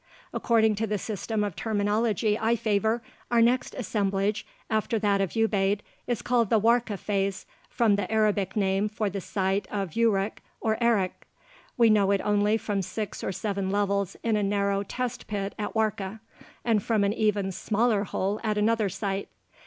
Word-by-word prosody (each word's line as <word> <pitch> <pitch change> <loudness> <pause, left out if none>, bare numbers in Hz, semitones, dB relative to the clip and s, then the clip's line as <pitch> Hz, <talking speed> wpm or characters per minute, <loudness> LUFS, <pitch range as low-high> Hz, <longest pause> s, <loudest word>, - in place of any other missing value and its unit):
According 220 -2 +3
to 225 +1 -1
the 210 0 0
system 210 +2 -2
of 200 -5 -3
terminology 215 0 +1
I 225 +2 +1
favor, 220 +1 0 0.3
our 235 - +3
next 240 +3 +2
"assemblage" 205 -2 -1 0.2
after 220 +1 0
that 200 -2 +2
of 195 - -1
Ubaid 205 -2 +2 0.3
is 240 -3 -1
called 240 -4 +2
the 225 - +4
Warka 230 -1 +2
phase, 195 -1 -2 0.2
from 225 -5 +2
the 205 - -3
Arabic 210 -3 +1
name 195 0 +1
for 215 -1 -2
the 195 0 -4
site 195 0 -1
of 195 -5 -3
Uruk 215 -3 +1 0.2
or 220 +1 0
Erich. 205 -6 +1 0.5
We 230 -2 +6
know 205 -2 +4
it 200 -1 +2
only 210 +1 +2
from 205 -3 -2
six 210 +3 -5
or - - -1
seven 195 0 -2
levels 200 -1 0
in 230 -2 +2
a 210 - +1
narrow 200 0 +1
test 245 +4 -4
pit 200 -1 -3
at 210 - -3
Warka, 215 -1 -1 0.5
and 225 -3 +3
from 215 0 +1
an 200 +1 +2
even 210 -3 +1
smaller 215 +2 +1
hole 200 +1 -2
at 215 -2 0
another 215 -1 +2
site. 195 +1 -3
210 Hz, 170 wpm, -27 LUFS, 200-220 Hz, 0.5 s, We